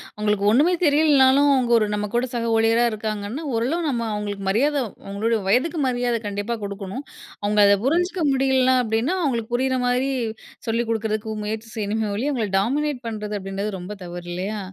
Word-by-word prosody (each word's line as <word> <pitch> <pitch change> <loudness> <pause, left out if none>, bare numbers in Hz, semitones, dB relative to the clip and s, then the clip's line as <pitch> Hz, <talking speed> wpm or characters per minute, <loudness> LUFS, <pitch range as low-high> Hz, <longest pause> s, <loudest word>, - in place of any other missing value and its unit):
அவுங்களுக்கு 210 -1 0
ஒன்னுமே 295 +10 +4
தெரியலனாலும், 285 -2 +5
அவுங்க 250 -3 +1
ஒரு 220 - +2
நம்ம 210 0 -1
கூட 240 - +2
சக 230 -1 -1
ஊழியரா 225 +1 +3
இருக்காங்கன்னா, 215 +5 -4
ஓரளவு 300 +9 0
நம்ம 235 -4 -1
அவுங்களுக்கு 205 -1 -4
மரியாத 280 +9 +2 0.3
அவுங்களோட 220 +3 0
வயதுக்கு 275 - +2
மரியாத 245 -1 0
கண்டிப்பா 205 +3 -3
குடுக்கணும். 200 +6 -6 0.4
அவுங்க 210 0 +3
அத 200 0 +5
புரிஞ்சுக்க 350 +4 +1
முடியலன்னா 260 -1 +3
அப்பிடின்னா 225 +10 0
அவுங்களுக்கு 240 -5 -1
புரியிற 260 +1 +1
மாரி 250 +2 +1 0.6
சொல்லிக் 230 +1 0
கொடுக்குறதுக்கு 220 -1 -2
முயற்சி 220 +1 -4
செய்யணுமே 215 0 -1
ஒழிய 275 +7 -1
அவுங்கள 225 -6 -1
டாமினேட் 275 +3 -1
பண்றது 210 -2 -4
அப்பிடின்றது 195 +1 -4
ரொம்ப 185 +4 -7
தவறு 175 0 -8
இல்லயா! 200 +4 -3
230 Hz, 160 wpm, -23 LUFS, 210-260 Hz, 0.6 s, தெரியலனாலும்